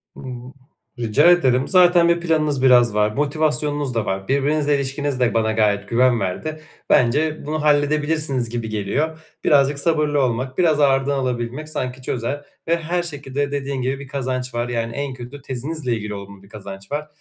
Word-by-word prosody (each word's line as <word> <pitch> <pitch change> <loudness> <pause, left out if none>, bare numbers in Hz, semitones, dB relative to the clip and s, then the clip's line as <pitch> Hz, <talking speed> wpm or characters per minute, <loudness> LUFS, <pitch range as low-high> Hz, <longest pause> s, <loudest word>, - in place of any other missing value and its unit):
Hımm. 125 0 -8 0.5
Rica 115 +9 +4
ederim. 130 -7 +3
Zaten 175 -2 +5
bir 170 0 +2
planınız 155 -5 +1
biraz 120 -4 +5
var, 105 0 +2
motivasyonunuz 145 -1 -1
da 115 - 0
var. 95 0 -3
Birbirinizle 145 +2 +1
ilişkiniz 140 0 -2
de 125 -2 +2
bana 110 -1 +1
gayet 105 -2 +1
güven 120 0 +3
verdi. 155 +12 -4 0.3
Bence, 150 +6 +2
bunu 155 +1 -2
halledebilirsiniz 145 -3 +1
gibi 115 -1 -4
geliyor. 125 +10 -2 0.2
Birazcık 140 0 +3
sabırlı 150 -2 +2
olmak, 130 +1 -1
biraz 160 -4 +3
ağırdan 140 0 +3
alabilmek 125 +3 -3
sanki 130 -3 -4
çözer 130 +4 -3 0.2
ve 170 +1 +2
her 170 +2 -2
şekilde 145 -3 -4
dediğin 140 -1 -3
gibi 130 +2 -2
bir 140 - -9
kazanç 130 -2 -3
var. 120 +1 -2
Yani, 115 -1 -2
en 140 -1 -3
kötü 130 +3 -10
tezinizle 135 +1 -3
ilgili 105 -2 -4
olumlu 100 -1 -10
bir 100 - -18
kazanç 100 -2 -10
var. 150 +1 -3
135 Hz, 165 wpm, -21 LUFS, 120-150 Hz, 0.5 s, Zaten